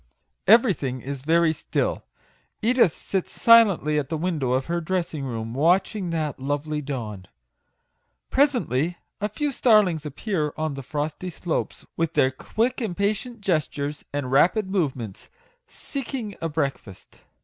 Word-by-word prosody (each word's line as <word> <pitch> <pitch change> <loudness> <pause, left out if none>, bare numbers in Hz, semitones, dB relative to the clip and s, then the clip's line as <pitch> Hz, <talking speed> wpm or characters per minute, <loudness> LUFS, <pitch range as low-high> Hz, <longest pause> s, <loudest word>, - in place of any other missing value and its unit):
Everything 190 - +4
is 140 +1 -6
very 165 +2 +3
still. - - -2 0.6
Edith 235 - +3
sits 190 -2 -4
silently 200 -10 +6
at 145 - -4
the 160 - -1
window 155 -7 -1
of 130 +1 +1
her 170 0 -1
dressing 170 -3 -2
room, 115 -3 -4
watching 180 - +2
that 155 -4 -2
lovely 145 +3 -2
dawn. 110 -10 -5 1.0
Presently 180 - +2 0.2
a 210 - -1
few 290 +8 -2
starlings 210 - +4
appear 150 - -2
on 155 -1 -1
the 135 - -6
frosty 150 +6 -4
slopes, 170 -1 -3
with 165 -1 -1
their 130 - +4
quick, 230 - -1
impatient 210 +3 -2
gestures 150 -5 -1
and 140 -3 -3
rapid 185 +8 +3
movements, 130 - -2 0.4
seek 275 - -6
ing 215 -6 -4
a 165 - -1
breakfast. 140 - -4
160 Hz, 135 wpm, -24 LUFS, 140-200 Hz, 1.0 s, silently